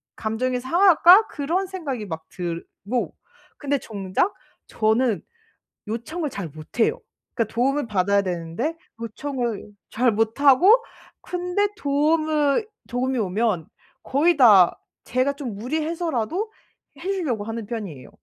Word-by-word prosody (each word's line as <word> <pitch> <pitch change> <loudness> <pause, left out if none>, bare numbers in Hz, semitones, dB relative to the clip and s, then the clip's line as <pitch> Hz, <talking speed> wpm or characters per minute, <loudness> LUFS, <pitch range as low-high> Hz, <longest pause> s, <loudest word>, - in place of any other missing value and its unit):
감정이 245 +3 -1
상할까?' 355 - +6
그런 340 +7 -2
생각이 280 - -5
막 160 -2 -6
들고. 180 +7 -4 0.5
근데 285 -1 0
정작 205 - -2 0.3
저는 220 0 +1 0.7
요청을 300 +8 -3
잘 200 -8 -5
못해요. 225 - -1 0.3
그러니까 230 -3 -1
도움을 270 +2 +1
받아야 200 0 +2
되는데 185 - -3 0.2
요청을 235 -2 -4 0.2
잘 245 +1 +2
못 225 +3 0
하고 290 - +7 0.5
근데 360 +3 -1
도움으 300 +2 +2 0.2
도움이 255 +1 -1
오면 200 -3 0 0.4
거의 300 +4 +2
다 205 -9 +6 0.3
제가 255 +3 +1
좀 260 -8 -6
무리해서라도 320 - -2 0.5
해 385 - -2
주려고 280 - -2
하는 225 0 -5
편이에요. 200 - -6
255 Hz, 260 characters per minute, -23 LUFS, 215-310 Hz, 0.7 s, 하고